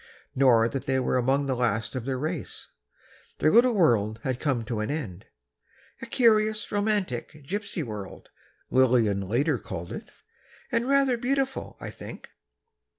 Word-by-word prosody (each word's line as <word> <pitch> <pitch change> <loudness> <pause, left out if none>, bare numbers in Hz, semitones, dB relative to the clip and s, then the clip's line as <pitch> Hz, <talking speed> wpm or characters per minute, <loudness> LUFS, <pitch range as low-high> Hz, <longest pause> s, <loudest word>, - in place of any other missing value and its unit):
Nor 120 -4 +5
that 135 +3 -5
they 130 0 +2
were 130 - +1
among 135 +3 +1
the 135 -1 0
last 115 -3 -1
of 130 -3 -4
their 130 -1 -1
race. 155 +2 -5 0.7
Their 155 - +3
little 240 +1 +5
world 110 - +2
had 130 -2 -2
come 130 -7 -1
to 115 -1 -3
an 110 - -2
end—"A 85 - -9
curious, 215 -3 +2
romantic, 205 - -1
gypsy 200 0 -3
world," 105 -6 -8 0.4
Lillian 120 -6 +3 0.4
called 85 -3 -7
it - - -4
later, - - -24 0.6
"and 240 +3 0
rather 275 -3 +3
beautiful, 270 +2 -2
I - - -6
think." - - -10
130 Hz, 145 wpm, -26 LUFS, -, 0.7 s, Nor